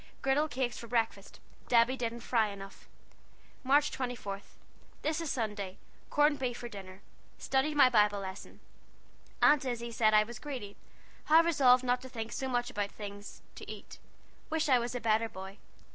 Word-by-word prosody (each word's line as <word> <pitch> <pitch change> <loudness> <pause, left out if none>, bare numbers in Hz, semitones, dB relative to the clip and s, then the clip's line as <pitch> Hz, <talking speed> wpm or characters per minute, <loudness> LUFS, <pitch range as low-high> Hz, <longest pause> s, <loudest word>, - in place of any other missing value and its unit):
Gridel 275 +3 +2
cakes 250 -2 -2
for 235 - -9
brekfast. 225 -4 -1 0.3
Debby 235 +2 +4
didn't 235 -2 -4
fry 230 -2 +2
enuff. 195 -1 -10 0.8
March 285 +3 +3
24. 240 -6 -4 0.6
This 310 +2 0
is 330 - -3
Sunday. 205 -5 -3 0.3
Corn 295 0 +3
befe 250 -2 -1
for 240 - -6
dinnir. 195 -3 -10 0.4
Studdied 275 +3 0
my 280 -3 +7
Bibel 210 -4 +3
leson. 190 0 -8 0.8
Aunt 295 -2 +6
Issy 235 -2 -3
said 215 -2 +3
I 215 - +6
was 225 +1 -9
gredy. 250 -9 -6 0.5
Have 320 +2 +6
resollved 260 -6 +5
not 250 0 +1
to 260 - -9
think 225 -2 -5
so 265 - -3
much 245 -1 -1
about 205 -1 -2
things 205 -1 -9
to - - -9
ete. - - -11 0.5
Wish 320 -1 0
I 255 -2 +6
was 240 +1 -3
a - - -1
beter 225 0 +1
boy. 190 +1 -9
240 Hz, 165 wpm, -31 LUFS, 210-265 Hz, 0.8 s, my